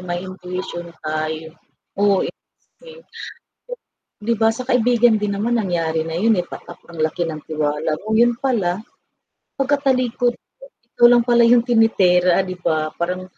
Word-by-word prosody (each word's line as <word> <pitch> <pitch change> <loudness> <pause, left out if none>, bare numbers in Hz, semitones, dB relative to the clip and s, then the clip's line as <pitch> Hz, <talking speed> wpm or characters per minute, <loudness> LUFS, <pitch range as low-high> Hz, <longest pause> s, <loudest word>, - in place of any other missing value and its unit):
may 175 0 -5
intuition 180 -2 -7 0.2
tayo. 155 +1 -4 0.5
Oo, 200 -2 +3
eh. - - -5 0.5
k 485 0 -14 1.2
'Di 230 +2 0
ba 225 0 +3
sa 255 - -5
kaibigan 240 -2 +3
din 205 -1 -2
naman 230 +4 0
nangyari 165 -5 -1
na 165 - -5
yun, 215 +4 +2
eh, 175 - -2
patap - - -11
ang 165 -2 -5
laki 170 +2 -1
ng 155 -2 -6
tiwala 155 0 -1
mo, 215 +1 -2
yun 235 +1 +3
pala 205 -10 0 0.8
pagkatalikod 260 -3 0
mo - - -19 0.3
ikaw 240 - +6
lang 240 -1 +4
pala 240 -1 +4
yung 240 0 +5
tinitira 190 -6 +3
'di 185 -1 -6
ba, 155 -2 -1
parang 180 +2 -2
195 Hz, 155 wpm, -20 LUFS, 170-240 Hz, 1.2 s, ikaw